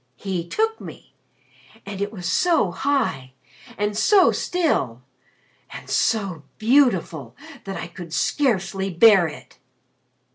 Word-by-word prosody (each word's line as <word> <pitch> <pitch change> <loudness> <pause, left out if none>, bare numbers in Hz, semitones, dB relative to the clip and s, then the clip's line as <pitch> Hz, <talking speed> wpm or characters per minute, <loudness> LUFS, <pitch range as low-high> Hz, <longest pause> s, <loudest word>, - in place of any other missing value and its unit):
He 180 +1 -4
took 445 - -1
me. - - -12 0.7
And 200 -1 -7
it 205 +1 -2
was 185 -5 -8
so 290 - +2
high 225 - -1 0.4
and 205 +1 -1
so 375 - +4
still 135 - -1 0.7
and - - -10
so 195 -8 0 0.2
beautiful 205 - +1 0.3
that 195 -1 -5
I - - -5
could 175 -3 -10
scarcely 195 - 0
bear 190 0 +5
it." 150 - -12
195 Hz, 115 wpm, -22 LUFS, 175-250 Hz, 0.7 s, bear